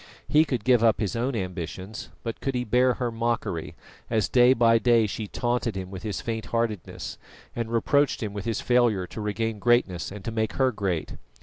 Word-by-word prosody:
He 155 +2 +5
could 125 -8 -2
give 125 -1 +4
up 110 -3 +4
his 105 +1 -1
own 120 +3 -1
ambitions, 95 +1 -5
but 115 -1 -5
could 135 -1 -2
he 125 - 0
bear 125 +2 +3
her 120 -2 -2
mockery, 115 -7 -2 0.3
as 110 -3 +1
day 125 0 +6
by 115 -2 +4
day 115 0 +4
she 105 +1 -4
taunted 120 -1 -1
him 95 -1 -5
with 95 -1 -7
his 105 -3 -4
faint 110 -1 -4
heartedness 115 -5 -3 0.4
and 115 -1 -3
reproached 135 +3 +2
him 105 -2 -4
with 100 -2 -5
his 115 -3 -1
failure 120 -6 +2
to 110 - -7
regain 105 +1 -2
greatness 100 -9 +2
and 100 -1 -9
to 115 - -2
make 110 -1 -1
her 130 -1 +2
great? 95 -7 -3
115 Hz, 200 wpm, -26 LUFS, 105-120 Hz, 0.4 s, day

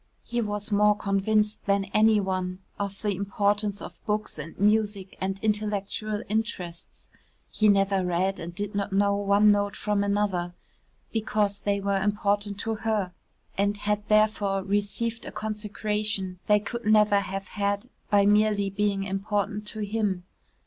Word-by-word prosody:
He 240 0 -2
was 210 -1 -3
more 210 0 +4
convinced 210 +1 +1
than 200 0 +2
any 215 0 +5
one 185 -2 -2 0.2
of 200 0 -4
the 205 -2 +1
importance 200 +1 0
of - - -10
books 210 -5 -1
and 155 +2 -8
music 205 -2 +1
and 190 +1 -1
intellectual 210 0 -1
interests 195 -6 -4 0.4
(he 215 -1 +3
never 195 -1 +3
read 180 +2 0
and 170 +1 -7
did 205 +1 -3
not 200 0 -2
know 200 +1 +3
one 205 +1 +4
note 205 -1 +1
from 205 -1 0
another) 200 -4 0 0.6
because 210 -2 0
they 200 -1 0
were 200 -1 0
important 205 0 0
to 225 - -1
her 215 -4 -1 0.5
and 200 +1 +2
had 210 0 0
therefore 215 -2 +2
received 205 +4 -1
a - - -6
consecration 210 -3 -2
they 210 0 +5
could 235 +3 -5
never 210 -1 +5
have 195 0 -5
had 200 +2 -1 0.2
by 200 -1 +4
merely 210 -1 +3
being 200 0 0
important 205 +2 -2
to 215 0 -4
him. 205 -4 -1
205 Hz, 150 wpm, -26 LUFS, 195-210 Hz, 0.6 s, any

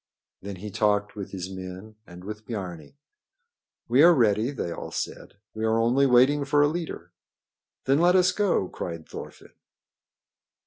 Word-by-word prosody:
Then 100 0 -6
he 105 +3 -8
talked 105 +1 0
with 100 -2 -6
his 95 -1 -6
men 95 +3 -8
and 90 +1 -12
with 105 +2 -8
Biarni. 90 - -7 0.9
"We 125 +3 +4
are 170 +2 +7
ready," 110 -2 +2
they 120 -11 -4
all 85 - -6
said. - - -6 0.2
"We 110 - -5
are 110 0 +2
only 125 +5 +3
waiting 130 +4 +4
for 145 +1 +3
a - - +4
leader." 165 +2 -5 0.7
"Then 135 +2 +3
let 175 +2 +4
us 185 0 +4
go!" 185 - +1
cried 85 -3 -7
Thorfinn. - - -10
110 Hz, 160 wpm, -26 LUFS, 95-140 Hz, 0.9 s, are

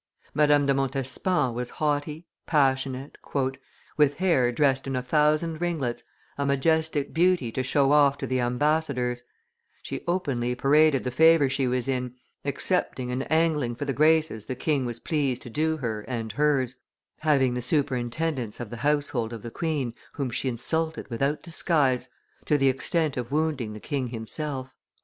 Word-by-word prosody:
Madame 145 -1 +4
de 140 - +3
Montespan 135 +2 0
was 125 +1 -4
haughty, 150 +2 -1 0.2
passionate, 135 -2 0 0.8
"with 145 -1 +4
hair 155 -10 +2
dressed 135 0 +1
in 135 - -2
a 125 - -1
thousand 155 +4 +1
ringlets, 155 -9 -2 0.4
a - - +1
majestic 150 +1 +1
beauty 170 -7 +2
to 130 - -2
show 135 +2 +2
off 140 -1 +5
to - - -4
the 130 0 -1
ambassadors: 125 -1 0 0.6
"she - - -5
openly 130 -9 -1
paraded 145 +1 +4
the 125 - -2
favor 160 +1 +5
she 130 0 0
was 125 +1 -1
in, 125 -2 -2 0.3
accepting 140 -3 0
and 130 +4 -3
angling 155 -7 +2
for 145 - -4
the 135 - -1
graces 155 -7 +2
the 130 - -3
king 135 -1 0
was 120 -1 -5
pleased 140 -6 -1
to 120 - -9
do 160 +4 0
her 115 -6 -3
and 115 -3 -3
hers, 135 -4 +1 0.4
having 140 -5 +2
the 125 - -2
superintendence 130 -1 -1
of 120 -4 -6
the 120 - -6
household 145 -5 0
of 115 -3 -7
the 120 - -6
queen 150 -7 -2 0.2
whom 135 -5 -3
she 130 - -1
insulted 160 +7 0
without 140 +6 -1
disguise, 140 -7 +1 0.4
to 150 - +3
the 135 -1 +3
extent 145 +2 0
of 125 0 -4
wounding 145 -7 -1
the 105 - -8
king 135 0 -3
himself. 130 +3 -5
135 Hz, 160 wpm, -26 LUFS, 125-155 Hz, 0.8 s, off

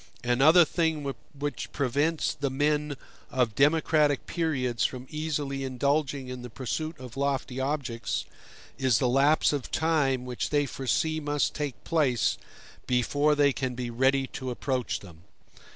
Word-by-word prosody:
Another 140 +8 +6
thing 160 -3 0 0.3
which 145 +1 -4
prevents 145 +4 0
the 140 -1 -2
men 145 +1 0 0.3
of 125 -4 +1
democratic 150 +1 +3
periods 130 -8 -1
from 130 -1 -2
easily 145 -3 -2
indulging 140 +1 0
in 125 0 -6
the 125 - -8
pursuit 155 +6 -4
of 125 -2 -9
lofty 135 -2 -1
objects, 130 -4 -2 0.5
is 130 -4 +3
the 125 - +1
lapse 140 +5 +4
of 140 -4 -3
time 145 -6 +1
which 125 -1 -3
they 145 -1 +2
foresee 150 +4 -1
must 145 -1 0
take 145 -4 -4
place 135 - +1 0.5
before 145 +4 +2
they 145 -1 +4
can 130 -2 -3
be 120 -1 -4
ready 135 +3 +2
to 130 0 -6
approach 125 0 -2
them. 85 -5 -13
140 Hz, 140 wpm, -28 LUFS, 125-150 Hz, 0.5 s, Another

